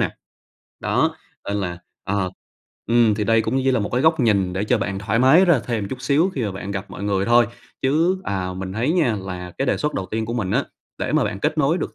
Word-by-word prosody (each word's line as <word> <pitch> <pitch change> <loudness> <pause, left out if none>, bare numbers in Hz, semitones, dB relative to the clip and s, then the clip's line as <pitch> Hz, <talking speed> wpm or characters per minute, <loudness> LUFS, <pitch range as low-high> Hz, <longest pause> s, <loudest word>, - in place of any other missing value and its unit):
nè? - - +1 0.7
Đó, - - +1 0.3
nên 100 - -1
là, 90 -3 -3 0.3
ờ, 100 -2 -1 0.6
ừm, 115 -2 +4
thì 105 0 -1
đây 115 +1 +4
cũng 115 +4 -1
như 135 0 +2
là 125 -4 +2
một 100 - -2
cái 125 - +2
góc 160 -1 +4
nhìn 100 -6 +2
để 95 +3 -1
cho 120 +2 +2
bạn 95 -1 -2
thoải 110 +3 0
mái 135 +9 +6
ra 170 -8 +4
thêm 110 -5 -2
chút 130 +2 -6
xíu 150 +8 +2
khi 130 - -2
mà 100 - -2
bạn 95 +1 -6
gặp 95 0 -5
mọi 95 - -8
người 100 -1 +1
thôi. 120 0 +5 0.4
Chứ, 165 +8 +2
à, 95 -2 -2
mình 95 0 -5
thấy 120 +9 0
nha 150 -11 +2
là 90 -1 -6
cái 135 - 0
đề - - +2
xuất 150 0 -2
đầu 95 -1 -2
tiên 110 +3 -3
của 115 - -3
mình 105 -6 -2
á, - - +1 0.3
để - - -2
mà - - +3
bạn 105 -1 -4
kết 155 - 0
nối 155 +4 +2
được - - -4
110 Hz, 255 wpm, -22 LUFS, 100-130 Hz, 0.7 s, mái